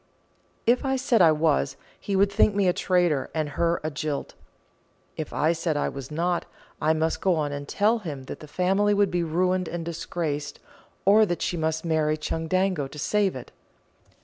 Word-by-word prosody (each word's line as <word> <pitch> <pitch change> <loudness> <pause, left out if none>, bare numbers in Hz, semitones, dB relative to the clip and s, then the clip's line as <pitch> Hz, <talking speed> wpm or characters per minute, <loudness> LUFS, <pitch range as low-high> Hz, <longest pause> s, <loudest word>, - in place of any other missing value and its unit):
If 240 +4 +3
I 265 -1 +1
said 255 -4 +2
I 165 -2 +7
was, 150 - +1 0.2
he 200 - -3
would 200 +1 +3
think 205 0 +3
me 200 -2 +2
a 180 - +4
traitor 175 -8 +1
and 155 -2 -1
her 170 +4 0
a 155 - -2
jilt; 145 0 -4 0.8
if 155 - -5
I 155 +2 +2
said 165 -2 -1
I - - 0
was 135 -2 -8
not, 170 +3 -1 0.4
I 155 - +3
must 160 +1 -1
go 185 -2 +3
on 150 -2 -1
and 145 0 -5
tell 220 +7 +2
him 150 -9 -6
that - - -8
the 155 - -11
family 195 +6 +2
would 200 -1 +2
be 175 - 0
ruined 180 +2 0
and 170 -1 -4
disgraced, 160 -3 -4 0.5
or 210 +3 +6
that 175 - -2
she - - -1
must 160 0 -1
marry 155 -2 +1
Chundango 165 +1 -1
to 145 - -12
save 200 +4 +1
it. 130 - -9
170 Hz, 190 wpm, -25 LUFS, 155-190 Hz, 0.8 s, I